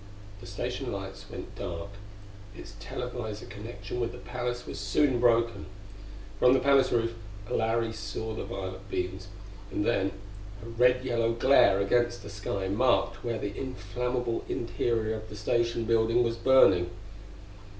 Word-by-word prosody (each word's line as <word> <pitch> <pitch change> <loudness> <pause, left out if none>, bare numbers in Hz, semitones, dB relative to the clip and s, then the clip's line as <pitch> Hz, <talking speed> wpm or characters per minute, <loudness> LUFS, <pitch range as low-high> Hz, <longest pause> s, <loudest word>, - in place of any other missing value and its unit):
The - - -11
station 125 +6 -3
lights 95 0 -7
went - - -8
dark; 85 +3 -5 0.7
its - - -10
televisor 110 - -5
connection 115 +3 -7
with 120 0 -1
the - - -8
palace 125 0 -4
was - - -6
soon 120 +6 +2
broken. 115 -2 +2 0.7
From 125 - +6
the 135 - +4
palace 135 0 +4
roof 115 -1 +1 0.4
Larry 115 0 +1
saw 110 0 -5
the - - -4
violet 95 0 -6
beams; 95 +1 -3 0.4
and 105 - -1
then 95 -4 +2 0.5
a - - -8
red 125 +2 +3
yellow 115 -2 +1
glare 115 -5 +5
against 120 +2 +1
the 100 - -8
sky 100 -1 -3
marked 125 +7 +2
where 120 -2 -1
the 100 -1 -4
inflammable 125 -2 -2
interior 115 -1 -1
of 110 0 -10
the 105 - -8
Station 115 +2 0
building 115 +1 +3
was 115 -1 0
burning. 115 -9 +5
115 Hz, 145 wpm, -29 LUFS, 100-125 Hz, 0.7 s, From